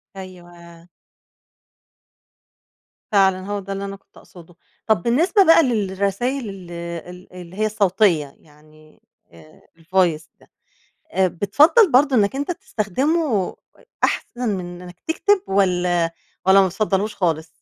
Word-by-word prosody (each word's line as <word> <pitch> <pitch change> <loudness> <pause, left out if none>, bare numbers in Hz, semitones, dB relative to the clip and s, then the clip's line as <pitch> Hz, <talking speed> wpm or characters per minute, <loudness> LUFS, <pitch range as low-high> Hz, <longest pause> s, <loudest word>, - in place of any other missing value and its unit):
أيوه. 175 -2 -13 2.2
فعلًا 190 -2 +3
هو 205 0 -3
ده 195 0 -6
اللي 195 0 -5
أنا 195 0 -6
كنت 195 0 -23
أقصده. 175 -1 -16 0.3
طب 220 -6 +2
بالنسبة 340 - +3
بقى 330 0 +6
للرسايل 215 +2 -2
ال 185 -3 -10 0.4
ال 180 +1 -13
اللي 180 0 -11
هي 215 +2 0
الصوتية 190 -8 +1
يعني، 155 0 -22 0.3
آآ، 80 -2 -18 0.2
الvoice 165 -2 0
ده، - - -23 0.6
آآ، 190 -1 +2
بتفَضّل 295 - +3
برضو 275 +2 +4
إنّك 210 +1 +2
أنت 285 +5 -3
تستخدمه 280 - -1 0.5
أحسن 245 -1 -2
من 175 -1 -8
إنّك 180 -1 -13
تكتب 385 +4 +1
والّا 180 -3 +1 0.3
والّا 190 +1 +6
ما 190 - +3
بتفضلهوش 205 +2 -1
خالص؟ 165 -4 -1
195 Hz, 125 wpm, -21 LUFS, 175-225 Hz, 2.2 s, بقى